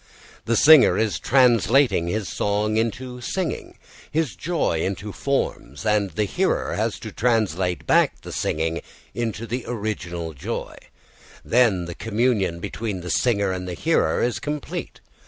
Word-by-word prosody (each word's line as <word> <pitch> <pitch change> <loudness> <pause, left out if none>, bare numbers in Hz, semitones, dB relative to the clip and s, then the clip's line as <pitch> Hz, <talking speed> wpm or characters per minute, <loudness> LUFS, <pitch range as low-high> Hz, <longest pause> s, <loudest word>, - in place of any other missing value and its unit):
The 115 - +1
singer 150 +4 +7
is 110 -2 0
translating 125 -5 +4
his 105 +3 -2
song 105 +1 0
into 125 +3 -2
singing, 180 +6 -3 0.3
his 150 - -1
joy 145 - -1
into 100 +3 -3
forms, 110 - -2
and 105 -2 +2
the 95 +5 -1
hearer 95 - 0
has - - -1
to - - -6
translate 95 - 0
back - - +3
the - - -9
singing 80 +1 -1 0.3
into 115 -1 -3
the 120 +2 -3
original 90 -8 -4
joy; 70 - -5 0.7
then 110 -8 +3
the 85 - -6
communion 110 -5 0
between 105 0 -4
the 90 - -4
singer 100 -6 +2
and 90 0 -4
the 90 - -4
hearer 80 +1 +1
is 120 -1 0
complete. 150 -1 -5
110 Hz, 140 wpm, -23 LUFS, 90-125 Hz, 0.7 s, singer